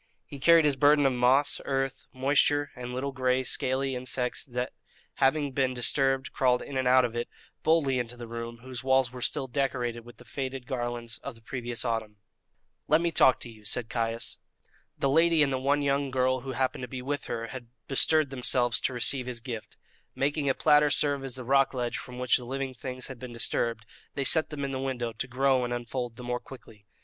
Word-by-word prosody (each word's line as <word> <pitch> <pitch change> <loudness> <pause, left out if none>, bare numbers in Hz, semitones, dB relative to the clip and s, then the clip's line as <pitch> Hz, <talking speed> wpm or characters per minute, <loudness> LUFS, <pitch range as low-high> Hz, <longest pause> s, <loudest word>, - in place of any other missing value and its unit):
He 140 - -10
carried 165 +3 +6
his 145 -2 +3
burden 145 +1 +5
of 135 - +3
moss, 130 +4 +3
earth, 135 -1 -2
moisture, 145 +2 +2
and 125 0 -6
little 130 +3 -3
gray 130 -1 +1
scaly 130 +2 -1
insects 125 0 -1
that, 125 -1 -4 0.4
having 140 +1 +2
been 130 -1 0
disturbed, 135 +2 +2
crawled 125 -2 +2
in 140 - -8
and 130 -1 +1
out 130 0 +6
of 120 -1 -4
it, 120 0 -3 0.3
boldly 150 -5 +2
into 120 0 -5
the 120 -1 -8
room, 115 0 -6
whose 130 -1 -7
walls 130 -2 +3
were 125 -1 -9
still 140 +2 0
decorated 125 -3 -2
with 120 0 -14
the - - -15
faded 130 -2 -5
garlands 120 -3 -3
of - - -7
the 115 - -19
previous 120 0 -3
autumn. 115 -3 -2 0.7
"Let 155 - +5
me 170 0 0
talk 130 -4 +5
to 120 - -6
you," 110 -1 -16
said 115 +2 -2
Caius. 115 -1 -2 0.6
The 140 - +1
lady 165 +2 +4
and 135 -2 0
the 130 - 0
one 140 +2 +1
young 140 0 +1
girl 130 0 +1
who 130 +1 -6
happened 130 +1 -1
to 125 - -4
be 125 +1 -6
with 145 +1 -3
her 115 0 -4
had 130 -3 -8 0.2
bestirred 140 +3 +3
themselves 125 -2 +1
to 130 - 0
receive 125 +1 +1
his 125 -2 -4
gift. 115 -3 -7 0.4
Making 145 +1 0
a 135 - +2
platter 150 0 +5
serve 145 -1 +2
as 135 -2 -3
the 130 - -5
rock 135 +2 +3
ledge 120 -1 -2
from 125 -1 -9
which 125 -1 +3
the 125 - -8
living 135 +1 -3
things 130 +1 -5
had 130 -3 -8
been 125 -1 -8
disturbed, 115 -1 -1 0.3
they 140 - -1
set 155 +4 +3
them 140 -2 -4
in 135 - -3
the 130 - -3
window 125 -3 -3
to 110 - -4
grow 130 0 +2
and 120 - -3
unfold 120 0 -4
the 125 - -9
more 125 0 -2
quickly. 110 -6 -14
130 Hz, 215 wpm, -28 LUFS, 120-135 Hz, 0.7 s, carried